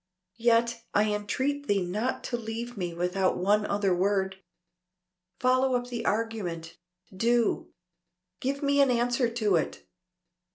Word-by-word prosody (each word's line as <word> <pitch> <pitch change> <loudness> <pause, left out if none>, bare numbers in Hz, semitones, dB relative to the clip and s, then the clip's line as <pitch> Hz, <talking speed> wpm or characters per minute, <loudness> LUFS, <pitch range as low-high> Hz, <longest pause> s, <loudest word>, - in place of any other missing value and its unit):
"Yet 230 0 +2
I 210 0 +3
entreat 265 +8 -2
thee 200 -2 +2
not 215 +8 -2
to 240 - -2
leave 235 +1 -5
me 180 -4 -3
without 180 +2 0
one 205 +3 +2
other 200 -2 +1
word. 190 +1 0 1.0
Follow 255 +1 +3
up 245 0 -2
the 240 -1 -4
argument 200 -7 -2 0.4
do. 235 +3 +1 0.7
Give 275 +2 -2
me 280 0 +3
an 275 - +4
answer 245 0 +2
to 215 -6 +2
it." 160 - -3
225 Hz, 130 wpm, -28 LUFS, 195-245 Hz, 1.0 s, an